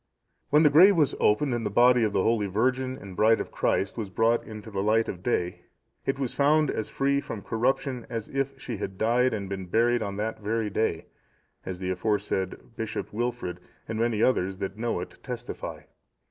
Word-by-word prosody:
When 150 +2 +5
the 150 - +6
grave 185 +7 +8
was 150 -4 +3
opened 120 +6 +3
and 120 -1 -1
the - - -1
body 120 +3 +5
of 110 - +1
the 95 - +1
holy 110 -3 +2
virgin 130 +6 0
and 95 -2 -10
bride 110 +4 +4
of - - -5
Christ 100 +4 0
was 110 -4 -3
brought 115 +4 +2
into 110 0 -9
the 95 -1 -2
light 110 +2 +2
of 90 - -5
day, 90 -5 -1 0.5
it 135 - +1
was 135 -3 -2
found 150 +1 +3
as 110 - -3
free 140 +1 +1
from 115 -8 -7
corruption 125 +2 -1
as 115 -2 -4
if 135 0 -3
she 120 -4 -5
had 95 -1 -5
died 120 +4 +2
and 100 -3 -3
been 95 -1 -5
buried 120 +5 +2
on 100 -2 -3
that 110 +2 -3
very 110 0 -1
day; 95 -6 -1 0.6
as 95 -1 -4
the 95 0 -3
aforesaid 100 +2 -2
Bishop 110 -2 -4
Wilfrid, 120 -5 -3 0.3
and 110 0 -3
many 115 -2 +1
others 95 -7 +1
that 95 0 -4
know 115 +2 -2
it, - - -9
testify. - - -6
115 Hz, 200 wpm, -27 LUFS, 100-125 Hz, 0.6 s, grave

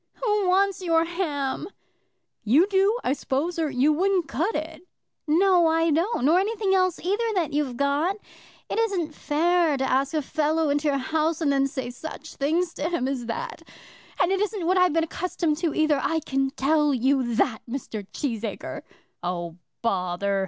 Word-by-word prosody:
"Who 420 -5 0
wants 390 +1 +2
your 330 -2 +2
ham?" 315 -4 -2 0.8
"You 265 - +5
do, 400 +3 +2
I 260 - +1
suppose, 305 +5 -2
or 315 -2 +1
you 275 +3 +2
wouldn't 370 +1 +1
cut 330 - -1
it." 315 +1 -4 0.5
"No 350 +2 +4
I 325 0 +2
don't; 330 - +1
nor 330 +5 +5
anything 405 -1 0
else 370 -2 +2
either 405 +6 -1
that 335 -6 0
you've 280 -5 -1
got. 285 +7 +1 0.5
It - - -2
isn't 375 -9 0
fair 325 +1 +1
to 265 - -1
ask 270 +3 +1
a 305 - 0
fellow 310 +2 0
into 290 +1 0
your 280 -1 +2
house, 315 +4 0
and 305 -4 +1
then 275 0 +2
say 260 -3 -5
such 315 +4 -9
things 330 +5 0
to 305 +3 -2
him 300 -8 -1
as 255 -4 -3
that. 480 - -5 0.6
And 360 +1 +3
it 385 - +1
isn't 415 -4 -2
what 370 +2 +2
I've 365 -3 +4
been 330 0 +2
accustomed 330 -1 -2
to 335 -2 0
either; 310 -2 +2
I 325 +4 0
can 270 -1 0
tell 295 +1 +2
you 255 -1 +1
that, 220 0 +1
Mr. 225 -6 -5
Cheesacre." 230 -7 -4 0.4
"Oh, 175 -1 -4 0.3
bother!" 195 -2 0
315 Hz, 175 wpm, -25 LUFS, 275-360 Hz, 0.8 s, You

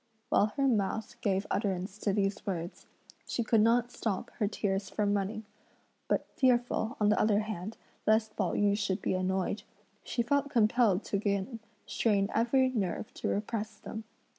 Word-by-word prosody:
While 205 - +4
her 275 -1 +3
mouth 220 -2 -1
gave 195 0 +1
utterance 195 -1 -1
to 205 - +1
these 195 0 0
words, 175 -3 -4 0.4
she 240 - -1
could 225 -1 +3
not 235 +2 +3
stop 205 -6 -3
her 210 - +2
tears 195 -1 -1
from 205 -1 +1
running; 205 +2 -2 0.6
but - - +1
fearful, 245 -2 +2
on 210 -1 +4
the 210 - +3
other 210 -1 +3
hand, 215 -1 -5 0.3
lest 220 0 +3
Pao 190 -4 0
yü 205 -1 +3
should 200 -2 -1
be - - +1
annoyed, 190 +2 0 0.4
she 235 - -1
felt 285 +4 +1
compelled 225 -5 +3
to 200 - -1
again 200 +3 -1 0.3
strain 200 -3 +1
every 260 +3 +3
nerve 210 -4 -2
to - - -4
repress 215 +1 -2
them. 220 0 -7
210 Hz, 165 wpm, -31 LUFS, 195-230 Hz, 0.6 s, While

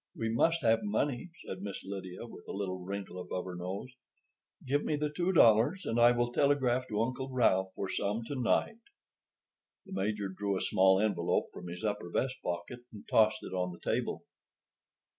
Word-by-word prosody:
"We 115 - -2
must 165 +8 +2
have 115 -1 +4
money," 120 - -1 0.2
said 95 - -6
Miss 100 -1 -6
Lydia, 95 +1 -6
with 115 - -12
a - - -5
little 95 -2 -3
wrinkle 95 -1 -5
above 90 0 -4
her 90 -1 -6
nose. 95 +7 -5 0.7
"Give 145 +3 +1
me 155 - 0
the 150 0 -1
two 175 +5 0
dollars, 135 - +5
and 115 - 0
I 120 0 +8
will 120 0 +1
telegraph 130 -2 +2
to 105 0 0
Uncle 130 +2 -3
Ralph 95 -7 +2
for 100 - -3
some 105 +4 -1
to 115 - -5
night." 130 - +1 1.1
The - - -10
Major 100 +1 -1
drew 100 +1 -2
a - - -3
small 95 0 +4
envelope 100 -5 +1
from 90 - -8
his 90 +2 -7
upper 105 -4 -2
vest 130 +8 -1
pocket 90 +7 -4
and 105 -2 -12
tossed 110 -1 +3
it - - -7
on 90 -1 -1
the 85 - -11
table. - - -1
110 Hz, 185 wpm, -32 LUFS, 95-125 Hz, 1.1 s, I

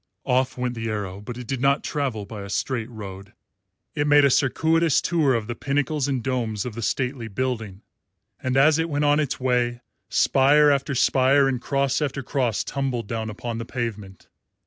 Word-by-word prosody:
Off 130 +1 +1
went 125 -1 -2
the 115 -1 -4
arrow, 100 -2 -4
but 120 +3 -7
it 125 - -7
did 130 +2 -3
not 140 +1 +2
travel 130 -9 -2
by 105 0 -8
a 100 - -8
straight 115 +2 -2
road. 100 -3 -9 0.6
It 145 -1 -1
made 145 -1 +6
a 140 - +4
circuitous 160 +4 +2
tour 155 -6 +2
of 115 -2 -2
the 120 - -4
pinnacles 145 +2 -1
and 130 -4 -1
domes 115 -6 -2
of 125 - -5
the 115 - -6
stately 125 +1 -2
building, 110 -3 -4 0.6
and 130 0 -1
as 150 +3 +5
it 165 +1 0
went 145 -1 0
on 145 +1 +4
its 145 -4 -1
way 120 -2 0 0.3
spire 145 +2 +4
after 140 0 0
spire 135 +2 +4
and 130 -3 -1
cross 140 +1 0
after 140 -2 -2
cross 125 -4 -1
tumbled 130 -3 -2
down 110 0 -3
upon 115 +2 -5
the - - -3
pavement. 110 -5 -6
130 Hz, 190 wpm, -24 LUFS, 115-140 Hz, 0.6 s, made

